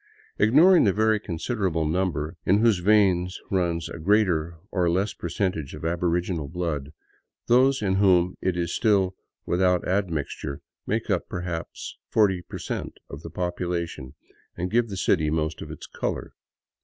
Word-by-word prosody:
Ignoring 155 - +6
the 100 - +3
very 110 +1 +2
considerable 90 -3 -2
number 80 -1 -1
in 95 - +4
whose 115 -5 +4
veins 95 -2 +3
runs 85 -4 0
a - - -8
greater 85 -3 +2 0.2
or 90 -3 +1
less 95 +5 0
percentage 85 -4 -3
of - - -8
aboriginal 85 -1 -1
blood, 80 -4 -3 0.5
those 130 +1 +4
in 95 -1 +1
whom 90 -3 +4
it 90 -1 0
is 85 -1 -1
still 100 -4 +2 0.3
without 90 0 +2
admixture 85 -7 -2 0.3
make 110 +1 -1
up 90 - -1
perhaps 90 -2 -5
forty 95 -5 +3
per - - -8
cent, - - -5
of 70 - -8
the 85 - -8
population, 85 -6 -3 0.4
and 90 +1 -3
give 115 0 +2
the 100 - -5
city 80 -5 +2
most 80 0 -1
of - - -7
its - - -8
color. - - -4
90 Hz, 150 wpm, -25 LUFS, 85-100 Hz, 0.5 s, Ignoring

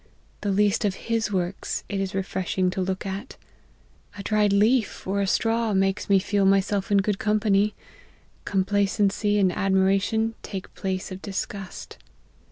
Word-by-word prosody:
The 205 - -1
least 205 +3 +2
of 200 -3 0
His 225 -2 -2
works 185 -1 -2
it 200 - -3
is 195 0 -3
refreshing 185 -1 -1
to 190 0 -2
look 190 +1 -2
at. 195 +6 -6 0.8
A 200 - -6
dried 210 -1 +2
leaf, 215 +3 +2
or 200 +1 0
a 195 - 0
straw, 225 +1 +1
makes 195 +1 0
me 200 - +6
feel 200 +1 +1
myself 195 +1 +2
in 200 - +5
good 205 -1 -1
company: 210 -1 +2 0.7
compla 200 +1 +1
cency 205 +1 +1
and 190 -2 +3
admiration 195 +4 +1
take 190 -2 -7
place 190 0 -3
of 185 +1 -7
disgust. 195 -1 -6
200 Hz, 155 wpm, -25 LUFS, 190-210 Hz, 0.8 s, me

